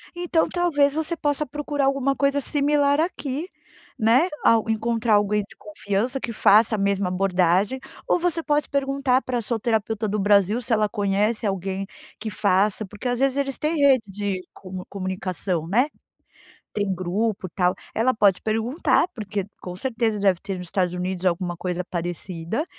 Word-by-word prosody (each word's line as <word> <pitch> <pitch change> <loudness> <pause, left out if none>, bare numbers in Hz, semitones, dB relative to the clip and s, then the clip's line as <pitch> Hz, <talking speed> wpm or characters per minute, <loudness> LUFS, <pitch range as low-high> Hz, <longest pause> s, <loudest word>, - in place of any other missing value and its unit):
Então 350 -2 +1
talvez 290 -6 +2
você 320 +2 -1
possa 295 -1 -1
procurar 290 0 -2
alguma 275 0 +1
coisa 280 +1 +1
similar 285 +1 +2
aqui, 315 -1 -2 0.5
né. 245 +11 +4
Ao 225 -1 +4
encontrar 225 0 +1
alguém 205 0 +2
de - - -17
confiança, 210 +5 -2
que 235 - -4
faça 215 +2 +5
a - - -2
mesma 200 -1 +1
abordagem, 185 +4 +1 0.3
ou - - +3
você 335 -1 0
pode 295 -2 +1
perguntar 275 -2 +1
para 250 -1 -2
a - - -1
sua 225 +1 -2
terapeuta 220 -1 0
do 210 +1 -1
Brasil 205 +3 +3
se 235 0 -1
ela 215 -1 +3
conhece 210 +2 0
alguém 195 0 -3 0.3
que 220 - -4
faça, 200 +1 +1
porque 210 +6 -7
às 245 -1 0
vezes 270 0 +2
eles 275 -1 -1
têm 310 +2 -1
rede 265 -8 +3
de 200 -2 -2
comu 185 -1 -8
comunicação, 185 -3 -3
né. 240 - +3 0.9
Tem 205 -2 -1
grupo, 185 +2 -2
tal. 180 +1 +1 0.2
Ela 255 +3 +2
pode 200 -4 +3
perguntar, 225 +11 +1
porque 205 -3 -4 0.2
com 180 -1 -7
certeza 225 -1 -1
deve 195 -3 +3
ter 195 -1 -4
nos 180 -1 -7
Estados 180 -1 0
Unidos 180 +1 -3
alguma 175 0 0
coisa 180 0 -3
parecida. 175 - -4
215 Hz, 165 wpm, -24 LUFS, 195-270 Hz, 0.9 s, faça